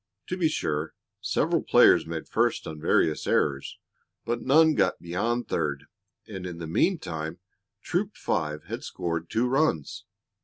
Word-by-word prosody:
To 185 - -1
be 180 -3 +2
sure, 75 - -2 0.3
several - - +1
players - - +5
made 80 -1 -5
first - - +1
on 75 -1 -7
various 75 0 +2
errors, 70 -2 0 0.5
but 120 0 -2
none 155 +4 +5
got - - +1
beyond 115 +8 -2
third, 70 -4 -2 0.4
and 95 -4 -7
in 90 -2 -7
the 85 - -6
meantime 80 - -1 0.5
Troop 195 +3 -2
Five 75 -1 -2
had 110 +7 -6
scored 85 -1 -4
two 120 +3 +1
runs. 130 - 0
85 Hz, 145 wpm, -27 LUFS, 80-125 Hz, 0.5 s, players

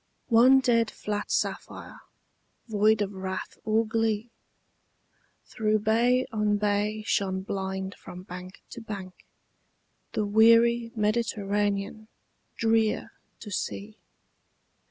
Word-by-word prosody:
One 255 +3 +6
dead 230 -3 +2
flat 205 0 -4
sapphire, - - -3 0.7
void 215 -1 +3
of 200 0 -5
wrath 190 0 -5
or 220 +1 +2
glee, 225 0 -1 1.1
Through 215 -2 0
bay 235 +4 +2
on 210 -1 +1
bay 210 +1 0
shone 190 -2 0
blind 190 0 -4
from 180 0 -11
bank 180 0 -10
to 235 - -8
bank 200 -4 -7 1.0
The 215 - 0
weary 230 +2 +4
Mediterranean, 210 -1 -1 0.5
drear 225 -1 +1 0.3
to 210 - -8
see. 205 +2 -5
215 Hz, 100 wpm, -27 LUFS, 200-225 Hz, 1.1 s, One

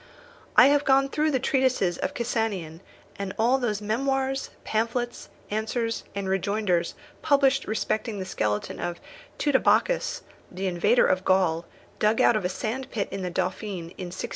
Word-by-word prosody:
I 250 - +10
have 290 0 +3
gone 275 0 +4
through 305 +2 +1
the 270 -4 +1
treatises 255 -9 +1
of - - -2
Cassanion, 205 -9 -2 0.4
and 195 -1 -4
all 245 +4 +3
those 215 -4 -2
memoirs, 270 +4 -1
pamphlets, 235 +2 -2 0.2
answers, 225 +2 -2
and 200 -1 -3
rejoinders 190 -2 0 0.3
published 275 -2 +3
respecting 215 0 -1
the 190 - -4
skeleton 105 - -2
of 175 0 -3 0.4
Teutobochus, - - +2 0.3
the 185 +2 -4
invader 190 +6 +3
of 185 0 +1
Gaul, 180 -3 +2 0.3
dug 215 +1 +2
out - - +5
of 215 - 0
a 180 - 0
sandpit 225 +1 -3
in 195 0 -4
the 180 - -2
Dauphiné, 180 -1 -3
in 185 - -4
1613. 180 - -5
215 Hz, 150 wpm, -26 LUFS, 185-260 Hz, 0.4 s, I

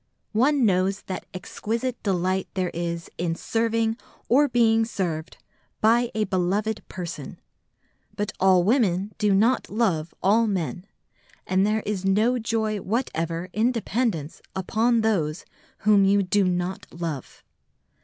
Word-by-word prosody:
One 265 +4 +3
knows 195 0 +1
the 185 -2 -5
exquisite 230 +6 -4
delight 185 -1 0
there 185 -2 -1
is 170 0 -3
in 170 -1 0
serving 225 +2 0 0.3
or 285 +5 +5
being 225 -3 +3
served 175 -8 -3 0.4
by 235 +2 +3
a 215 - +1
beloved 200 +3 0
person; 180 -3 -7 0.8
but 205 -1 -2
all 185 -1 +5
women 205 -3 +1
do 210 -2 +2
not 225 +6 +2
love 185 -8 0
all 225 +4 +4
men, 185 -1 -3 0.6
and 190 +2 +2
there 215 +1 +1
is 200 -3 -2
no 215 +6 +2
joy 220 -2 -1
whatever 175 -6 -2
in 225 +4 +2
dependence 220 - -2
upon 225 +5 +1
those 175 -8 0 0.4
whom 210 -2 +6
you 200 +1 +4
do 195 +2 +2
not 180 +1 -2
love. 165 -6 -6
200 Hz, 130 wpm, -25 LUFS, 180-225 Hz, 0.8 s, whom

